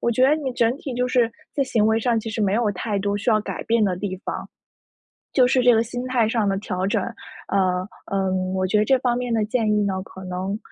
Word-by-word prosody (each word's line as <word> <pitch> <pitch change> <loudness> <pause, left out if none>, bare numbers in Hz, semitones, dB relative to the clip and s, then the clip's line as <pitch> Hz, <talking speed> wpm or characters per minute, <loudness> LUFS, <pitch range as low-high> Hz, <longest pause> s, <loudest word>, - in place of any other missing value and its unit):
我 235 - +1
觉 255 +3 +1
得 300 - +5
你 275 -4 -3
整 235 0 +2
体 275 -4 -6
就 250 +1 0
是 245 -3 +2 0.2
在 280 - +1
行 220 -5 +2
为 220 0 +3
上 230 0 +1
其 225 - -6
实 220 0 -2
没 195 -2 +2
有 225 -2 +2
太 200 +2 -2
多 200 +1 -1
需 205 +4 0
要 215 -1 +4
改 - - -5
变 230 -1 +2
的 185 -3 0
地 190 -1 -4
方。 - - -4 0.9
就 255 -2 +5
是 255 0 +3
这 245 -1 +6
个 225 - +3
心 245 +2 -5
态 240 -4 +2
上 220 -3 +1
的 195 0 +1
调 185 -2 -2
整， - - 0 0.5
呃， 185 -2 +1 0.2
呃， 195 -1 0 0.2
我 190 0 0
觉 195 +3 +2
得 210 - +3
这 265 -1 +4
方 245 -2 +1
面 245 -1 -2
的 220 - +2
建 225 0 0
议 210 -1 +2
呢， 190 -1 -1
可 190 0 -12
能 185 +3 -3
220 Hz, 275 characters per minute, -23 LUFS, 195-245 Hz, 0.9 s, 这